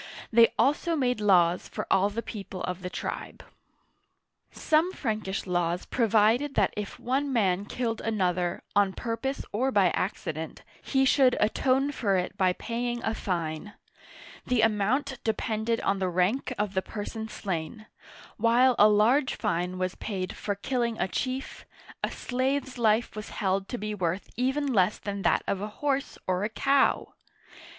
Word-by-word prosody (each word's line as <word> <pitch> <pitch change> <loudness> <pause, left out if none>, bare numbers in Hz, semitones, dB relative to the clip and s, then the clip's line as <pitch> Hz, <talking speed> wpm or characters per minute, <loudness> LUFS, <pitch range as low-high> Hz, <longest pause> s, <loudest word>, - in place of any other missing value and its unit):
They 230 0 +7
also 295 +4 +2
made 250 -6 0
laws 180 -4 +3
for - - -4
all 195 +2 +4
the 230 +3 -4
people 195 -4 -7
of 180 0 -3
the 180 - -4
tribe. - - -6 1.1
Some 320 +3 +1
Frankish 215 - -3
laws 175 -1 -1
provided 230 +4 +2
that 200 - +2
if 210 -1 -5
one 270 +3 -1
man 200 -5 +1
killed 230 0 -3
an 220 -2 -2
other, 180 -1 0
on 200 -2 +3
purpose 235 +6 -3
or 255 +6 0
by 195 -6 +4
accident, 160 -4 -4 0.2
he 270 0 +1
should 260 -1 +4
atone 265 +6 +2
for 200 -8 +1
it 180 0 -2
by 185 -1 +2
paying 240 +3 -3
a 220 - 0
fine. 170 -1 -3 0.7
The 250 -3 +2
amount 235 +6 +1
depended 220 +1 -1
on 195 - 0
the 185 -1 0
rank 185 +10 0
of 205 -1 -1
the 190 - +1
person 220 +2 -6
slain; 195 0 -4 0.5
while 240 +3 +4
a 210 - +8
large 235 +7 +3
fine 180 -3 -1
was 185 0 -1
paid 185 -3 -4
for 205 - -3
killing 235 +1 -1
a - - +1
chief, 260 +7 -4 0.4
a - - +1
slave's 260 0 -2
life 220 0 +2
was 215 0 -6
held 195 0 -1
to 245 - -3
be 215 -1 -4
worth 185 -1 -2
even 265 +4 0
less 190 -1 +3
than 200 0 -5
that - - +2
of 195 - -1
a 210 - -2
horse 280 -1 -1
or 185 +1 0
a 210 - 0
cow 275 +4 +2
215 Hz, 160 wpm, -27 LUFS, 190-250 Hz, 1.1 s, a